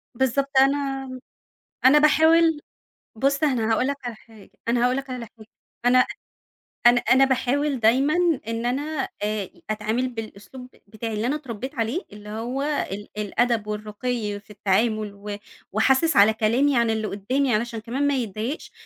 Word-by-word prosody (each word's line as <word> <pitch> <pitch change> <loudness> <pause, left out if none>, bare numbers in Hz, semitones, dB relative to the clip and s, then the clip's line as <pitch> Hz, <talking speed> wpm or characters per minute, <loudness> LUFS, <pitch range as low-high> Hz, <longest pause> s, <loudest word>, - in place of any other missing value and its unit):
بالضبط 265 +2 +1
أنا 270 -1 +1 0.8
أنا 290 +3 +7
باحاول 320 +1 +4 0.6
بُص، 275 +4 +1
أنا 235 -6 +1
هاقول 250 +4 +2
لَك 280 - -1
على 240 -2 -5
حاجة، 220 -2 -18 0.2
أنا 240 +1 +2
هاقول 250 +1 +2
لَك 275 -1 -5
على 250 -2 -5
حاجة 215 - -14 0.4
أنا 255 +1 +5 0.8
أنا 240 0 +7
أنا 265 +2 +4
باحاول 270 +1 0
دايمًا 260 +8 +3 0.3
إن 230 +1 -2
أنا، 280 +3 -2
آآ، 210 -2 -2 0.2
أتعامل 220 +4 -1
بالأسلوب 225 +2 -9
ب 255 - -23 0.2
بتاعي 220 +2 -6
اللي 215 +3 -1
أنا 290 +4 0
اتربيت 260 -1 -7
عليه 235 +7 -1
اللي 210 0 -11
هو 235 +6 -3
ال 210 -9 -3
الأدب 225 +1 0
والرقي 210 0 -3
في 210 - -27
التعامل 210 +1 0
و 205 0 -6 0.4
وأحسس 265 - +3
على 210 +2 +6
كلامي 245 +5 +2
عن 235 -1 +2
اللي 220 -1 -1
قدامي 250 +6 0
علشان 230 0 -2
كمان 255 +6 -2
ما 285 - +2
يتضايقش، 230 - -4
240 Hz, 155 wpm, -24 LUFS, 215-270 Hz, 0.8 s, أنا